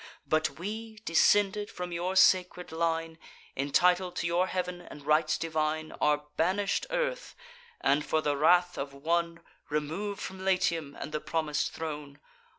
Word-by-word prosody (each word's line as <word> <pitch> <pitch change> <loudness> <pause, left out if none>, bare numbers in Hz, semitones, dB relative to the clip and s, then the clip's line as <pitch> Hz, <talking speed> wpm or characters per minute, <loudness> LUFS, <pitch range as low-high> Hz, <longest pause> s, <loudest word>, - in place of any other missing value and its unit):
But 155 0 0
we, 220 +5 -5
descended 205 +4 +3
from 180 0 -6
your 175 +2 -2
sacred 180 -2 +4
line, 165 0 -1 0.4
Entitled 180 +6 +2
to - - -2
your 175 +2 +2
heav'n 180 -1 -3
and 145 -4 -12
rites 155 +1 +3
divine, 155 -1 -1
Are 150 0 +2
banish'd 190 +4 +1
earth; - - -2 0.5
and, 145 +2 +3
for 155 - +1
the 145 -2 0
wrath 175 +4 +3
of 140 0 -5
one, 170 +3 -1 0.3
Remov'd 160 +8 -2
from 190 0 -6
Latium 170 -6 0
and 155 - -6
the 150 - -2
promis'd 150 -1 -1
throne. 150 -3 -6
165 Hz, 145 wpm, -29 LUFS, 155-185 Hz, 0.5 s, sacred